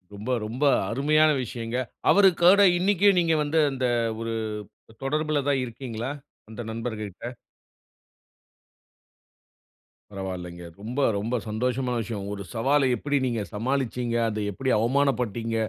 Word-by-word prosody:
ரொம்ப 105 Hz, +5 st, -4 dB
ரொம்ப 120 Hz, +7 st, -4 dB, 0.3 s
அருமையான 155 Hz, +5 st, +3 dB
விஷயங்க. 115 Hz, 0 st, -4 dB, 0.3 s
அவருக்கூட 190 Hz, 0 st, +6 dB, 0.2 s
இன்னைக்கே 200 Hz, +2 st, +3 dB
நீங்க 165 Hz, -2 st, +2 dB
வந்து 150 Hz, +2 st, +1 dB
அந்த 130 Hz, -1 st, -2 dB, 0.4 s
ஒரு 115 Hz, 0 st, -3 dB, 0.7 s
தொடர்புல 150 Hz, +1 st, 0 dB
தான் 135 Hz, -2 st, +2 dB
இருக்கீங்களா? 120 Hz, 0 st, -5 dB, 0.4 s
அந்த 110 Hz, +2 st, -7 dB
நண்பர்ககிட்ட. 110 Hz, -3 st, -5 dB, 2.9 s
பரவாயில்லைங்க. 90 Hz, -3 st, -6 dB, 0.2 s
ரொம்ப 120 Hz, +6 st, -4 dB, 0.2 s
ரொம்ப 115 Hz, +5 st, -2 dB
சந்தோஷமான 125 Hz, +3 st, -1 dB
விஷயம். 100 Hz, -2 st, -5 dB
ஒரு 100 Hz, -1 st, -6 dB
சவால 135 Hz, +4 st, +3 dB
எப்டி 145 Hz, +3 st, -1 dB
நீங்க 120 Hz, -3 st, -1 dB
சமாளிச்சீங்க. 125 Hz, +1 st, -1 dB
அத 110 Hz, 0 st, -3 dB
எப்டி 130 Hz, +7 st, -3 dB
அவமானப்பட்டீங்க? 120 Hz, -3 st, 0 dB
125 Hz, 105 wpm, -26 LUFS, 110-145 Hz, 2.9 s, அவருக்கூட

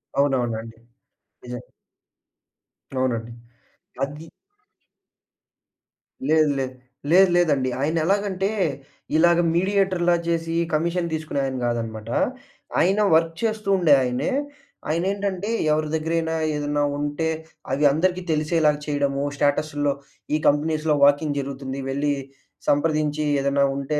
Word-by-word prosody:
అవునవునండి. 120 Hz, -5 st, 0 dB, 0.7 s
నిజం. 125 Hz, -1 st, -6 dB, 1.3 s
అవునండి. 120 Hz, -3 st, -1 dB, 0.7 s
అది 145 Hz, +3 st, -5 dB, 2.0 s
లేదు 155 Hz, -1 st, +4 dB
లేదు. 130 Hz, -1 st, -3 dB, 0.4 s
లేదు 190 Hz, +2 st, +7 dB
లేదండి. 145 Hz, -7 st, +2 dB
ఆయన 155 Hz, +3 st, 0 dB
ఎలాగంటే 195 Hz, 0 st, 0 dB, 0.7 s
ఇలాగ 170 Hz, +1 st, +5 dB, 0.2 s
మీడియేటర్‌లా 185 Hz, -2 st, +2 dB
చేసి, 165 Hz, 0 st, -1 dB, 0.2 s
కమిషన్ 170 Hz, +2 st, 0 dB
తీసుకునే 155 Hz, -2 st, -2 dB
ఆయన 130 Hz, -1 st, -3 dB
గాదనమాట. 115 Hz, -2 st, -3 dB, 0.7 s
ఆయన 190 Hz, +5 st, +3 dB, 0.2 s
వర్క్ 165 Hz, 0 st, +2 dB
చేస్తూ 215 Hz, -2 st, -1 dB
ఉండే 165 Hz, -5 st, +5 dB
ఆయనే. 125 Hz, -, -1 dB, 0.6 s
ఆయనేంటంటే, 195 Hz, +4 st, -1 dB, 0.2 s
ఎవరి 155 Hz, 0 st, +1 dB
దగ్గరైనా 160 Hz, +1 st, -1 dB, 0.2 s
ఏదన్నా 145 Hz, 0 st, 0 dB
ఉంటే, 145 Hz, +2 st, -2 dB, 0.4 s
అవి 145 Hz, +3 st, +2 dB
అందరికీ 180 Hz, +5 st, +1 dB
తెలిసేలాగా 155 Hz, -1 st, +2 dB
చేయడము 140 Hz, -1 st, 0 dB
స్టేటసుల్లో, 145 Hz, 0 st, +1 dB, 0.4 s
ఈ -, -, +3 dB
కంపెనీస్‌లో 155 Hz, +1 st, +2 dB
వాకిన్ 145 Hz, +1 st, +3 dB
జరుగుతుంది 135 Hz, -1 st, -5 dB
వెళ్లి 145 Hz, +2 st, 0 dB, 0.5 s
సంప్రదించి 150 Hz, 0 st, +1 dB, 0.2 s
ఏదన్నా 140 Hz, 0 st, +2 dB
ఉంటే, 150 Hz, +2 st, -1 dB
150 Hz, 100 wpm, -23 LUFS, 140-170 Hz, 2.0 s, లేదు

